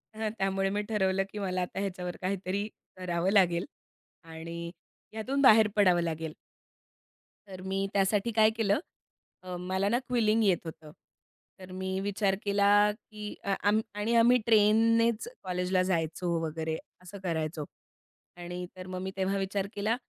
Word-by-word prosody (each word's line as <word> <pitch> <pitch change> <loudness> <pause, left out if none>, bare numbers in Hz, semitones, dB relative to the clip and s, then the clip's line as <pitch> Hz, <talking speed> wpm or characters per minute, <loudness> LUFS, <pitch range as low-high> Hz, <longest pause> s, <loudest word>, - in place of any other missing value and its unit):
हं 220 0 -2
त्यामुळे 195 0 0
मी 205 +1 -1
ठरवलं 195 -2 +1
की 210 - -6
मला 185 -2 -1
आता 180 +1 -4
ह्याच्यावर 180 -2 -4
काहीतरी 195 +2 -2 0.3
करावं 180 0 -1
लागेल 180 -3 +3 0.6
आणि 165 +1 -7 0.4
यातून 255 +6 -1
बाहेर 220 -5 +7
पडावं 185 -4 +4
लागेल. 160 -2 -3 1.2
तर 185 -1 -9
मी 195 +1 -1
त्यासाठी 200 +3 +2
काय 215 0 +6
केलं, 210 -1 +2 0.6
अ, 180 -1 -6
मला 185 +2 -1
ना, 235 +3 +2
क्विलिंग 225 -3 +2
येत 185 -4 +3
होतं. 160 -2 -9 0.7
तर 185 -1 -11
मी 190 0 -3
विचार 200 0 0
केला 200 0 +2 0.3
की 210 -1 -9
अ, 200 - +1
अं, 210 +1 +3
आणि 210 +3 -1
आम्ही 240 +2 +6
ट्रेननेच 225 - +4
कॉलेजला 180 0 0
जायचो 170 -1 -1
वगैरे 160 0 -3 0.3
असं 185 +2 -10
करायचो. 160 -3 -2 0.7
आणि 175 +1 -6
तर 185 0 -9
मग 185 0 -5
मी 190 0 -4
तेव्हा 195 +1 0
विचार 195 0 -2
केला 215 +3 +1
195 Hz, 145 wpm, -29 LUFS, 180-210 Hz, 1.2 s, बाहेर